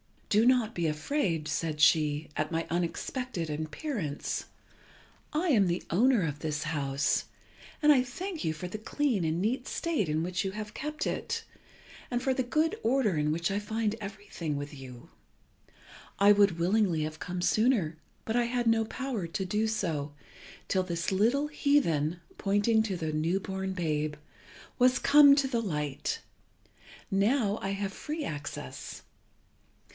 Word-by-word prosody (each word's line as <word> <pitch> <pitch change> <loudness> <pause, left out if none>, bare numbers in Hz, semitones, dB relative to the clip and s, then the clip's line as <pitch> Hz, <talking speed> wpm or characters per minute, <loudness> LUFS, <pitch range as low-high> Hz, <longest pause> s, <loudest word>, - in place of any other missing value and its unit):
"Do 215 +2 +4
not 245 -3 +3
be 170 -2 0
afraid," 160 - -1
said 150 0 -2
she, 150 -1 +4
"at 155 +2 -1
my 165 0 0
unexpected 175 - -2
appearance. 155 - -3 0.9
I 330 +4 +1
am 210 -10 +4
the 175 +1 -1
owner 230 +3 +4
of 150 -2 -3
this 150 -1 -2
house, 140 -3 0 0.6
and 300 - +7
I 270 -4 +6
thank 335 +8 -5
you 160 - +1
for 160 +3 -6
the 215 - -5
clean 230 - 0
and 160 +1 0
neat 245 +5 -1
state 320 - -1
in 155 +1 0
which 185 +1 -1
you 190 - -1
have 210 +1 -6
kept 305 +2 -4
it, - - -2 0.7
and 245 0 -1
for 265 - +2
the 260 - 0
good 310 +6 0
order 230 -5 +2
in 150 0 +1
which 170 +3 0
I 200 - 0
find 215 0 -1
everything 195 -6 -5
with 145 +1 -5
you. 130 -3 -11 1.1
I 200 +1 +6
would 200 -4 +4
willingly 180 -2 +2
have 155 0 -5
come 180 0 -4
sooner, 210 -6 +2 0.3
but 225 +2 0
I 240 - +3
had 240 0 -1
no 225 -1 +3
power 235 -6 -3
to 190 +4 -3
do 210 +4 0
so, 160 -9 -2 0.6
till 190 - +2
this 170 -1 -2
little 235 +10 +2
heathen 175 - +1 0.2
(pointing 205 +3 +3
to 205 -4 -2
the 160 -3 -3
new 160 +5 0
born 190 0 -4
babe) 155 -4 -1 0.6
was 250 +1 +5
come 285 -1 +7
to 280 -1 +2
the 240 -3 0
light. 150 -9 -2 0.9
Now 205 +2 +2
I 195 - -2
have 195 0 -3
free 305 +7 -4
access. 145 - -6
195 Hz, 160 wpm, -29 LUFS, 160-245 Hz, 1.1 s, and